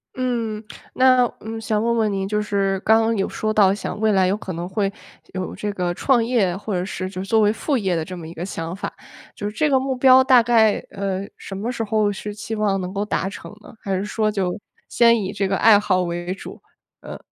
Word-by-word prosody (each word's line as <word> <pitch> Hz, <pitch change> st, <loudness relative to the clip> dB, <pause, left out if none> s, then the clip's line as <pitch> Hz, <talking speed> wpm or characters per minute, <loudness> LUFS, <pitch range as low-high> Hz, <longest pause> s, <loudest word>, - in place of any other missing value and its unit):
嗯， 230 Hz, -4 st, -2 dB, 0.3 s
那 255 Hz, -1 st, +5 dB
嗯， 225 Hz, +1 st, -6 dB
想 215 Hz, -1 st, -1 dB
问 235 Hz, 0 st, +1 dB
问 215 Hz, -2 st, +1 dB
您 195 Hz, -1 st, -2 dB
就 210 Hz, +1 st, 0 dB
是 195 Hz, -2 st, 0 dB
刚 220 Hz, +1 st, +4 dB
刚 225 Hz, 0 st, +1 dB
有 195 Hz, -, 0 dB
说 215 Hz, -, -2 dB
到 200 Hz, -3 st, +4 dB
想 205 Hz, -, -5 dB
未 220 Hz, -1 st, +2 dB
来 190 Hz, -2 st, +3 dB
有 195 Hz, +3 st, 0 dB
可 190 Hz, -3 st, -6 dB
能 170 Hz, +2 st, -5 dB
会 195 Hz, +1 st, -1 dB, 0.4 s
有 185 Hz, -1 st, -4 dB
这 210 Hz, -, -3 dB
个 180 Hz, -2 st, -1 dB
创 240 Hz, +3 st, +2 dB
业 220 Hz, -7 st, +1 dB
或 210 Hz, +2 st, -6 dB
者 180 Hz, 0 st, -1 dB
是 185 Hz, -1 st, -4 dB
就 185 Hz, 0 st, -5 dB
是 -, -, -9 dB
作 220 Hz, +2 st, +3 dB
为 210 Hz, -1 st, +4 dB
副 280 Hz, +6 st, -2 dB
业 190 Hz, -6 st, 0 dB
的 160 Hz, -1 st, -2 dB
这 185 Hz, -, -7 dB
么 170 Hz, -3 st, -8 dB
一 165 Hz, -, -9 dB
个 170 Hz, +1 st, -5 dB
想 165 Hz, -2 st, -5 dB
法。 195 Hz, -, -5 dB, 0.4 s
就 205 Hz, 0 st, -4 dB
是 210 Hz, -, -12 dB
这 305 Hz, -, +2 dB
个 265 Hz, -, +4 dB
目 265 Hz, 0 st, -2 dB
标 260 Hz, 0 st, +6 dB
大 255 Hz, -3 st, +6 dB
概， 225 Hz, -3 st, +4 dB, 0.2 s
呃， 195 Hz, -1 st, -3 dB
什 195 Hz, -, -8 dB
么 220 Hz, +5 st, -3 dB
时 235 Hz, -2 st, -3 dB
候 215 Hz, -1 st, +1 dB
是 205 Hz, +1 st, -6 dB
希 210 Hz, +2 st, -7 dB
望 210 Hz, -3 st, 0 dB
能 185 Hz, +1 st, -5 dB
够 200 Hz, -, -1 dB
达 210 Hz, -2 st, -1 dB
成 195 Hz, -, -8 dB
呢？ -, -, -14 dB
还 195 Hz, -1 st, -2 dB
是 195 Hz, -, -3 dB
说 215 Hz, 0 st, 0 dB
就 190 Hz, -4 st, -1 dB, 0.3 s
先 235 Hz, -1 st, +4 dB
以 190 Hz, -, -3 dB
这 195 Hz, -1 st, -1 dB
个 195 Hz, 0 st, 0 dB
爱 210 Hz, 0 st, +6 dB
好 185 Hz, -3 st, +1 dB
为 175 Hz, +1 st, -4 dB
主？ -, -, -10 dB, 0.4 s
呃。 -, -, -9 dB
205 Hz, 265 characters per minute, -22 LUFS, 190-225 Hz, 0.4 s, 标